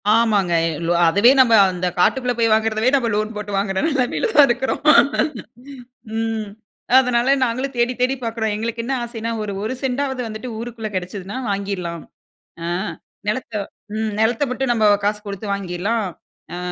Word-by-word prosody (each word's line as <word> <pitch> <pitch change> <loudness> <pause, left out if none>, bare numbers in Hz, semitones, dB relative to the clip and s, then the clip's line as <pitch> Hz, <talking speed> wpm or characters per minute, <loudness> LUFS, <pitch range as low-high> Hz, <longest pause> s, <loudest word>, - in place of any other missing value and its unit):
ஆமாங்க, 205 -6 +2 0.3
லோ - - +1 0.2
அதுவே 200 +9 +5
நம்ம 240 -3 +6 0.2
அந்த 180 0 -2
காட்டுக்குள்ளே 250 +6 +2
போய் 230 -1 +2
வாங்குறதவே, 220 +2 +2
நம்ம 245 -4 +1
லோன் 215 +1 -1
போட்டு 210 -1 -5
வாங்குற 195 -1 -1
நிலைமையில 280 - 0
தான் 290 -2 +8
இருக்கிறோம். 245 +3 -1 1.4
ம். 225 -1 -2 0.5
அதனால 250 +1 +2
நாங்களும் 255 +3 -3
தேடி 240 +1 +2
தேடி 260 +2 +2
பார்க்குறோம். 225 -2 -2
எங்களுக்கு 230 +2 -3
என்ன 270 - -1
ஆசைன்னா! 230 -1 -4
ஒரு 205 - -4
1 225 +4 -2
செண்டாவது 265 0 -1
வந்துட்டு, 215 +3 -6
ஊருக்குள்ள 230 -2 -5
கிடச்சிதுனா 185 +2 -5
வாங்கிறலாம். 195 -4 -3 0.6
அ - - -2 0.6
நிலத்த 225 0 -2 0.6
நிலத்த 225 +5 +2
மட்டும் 255 0 -1
நம்ப 220 -2 +1 0.2
காசு 210 0 0
கொடுத்து 200 +1 -6
வாங்கிறலாம். 200 +4 -2 0.5
அ - - -5
225 Hz, 145 wpm, -20 LUFS, 205-245 Hz, 1.4 s, தான்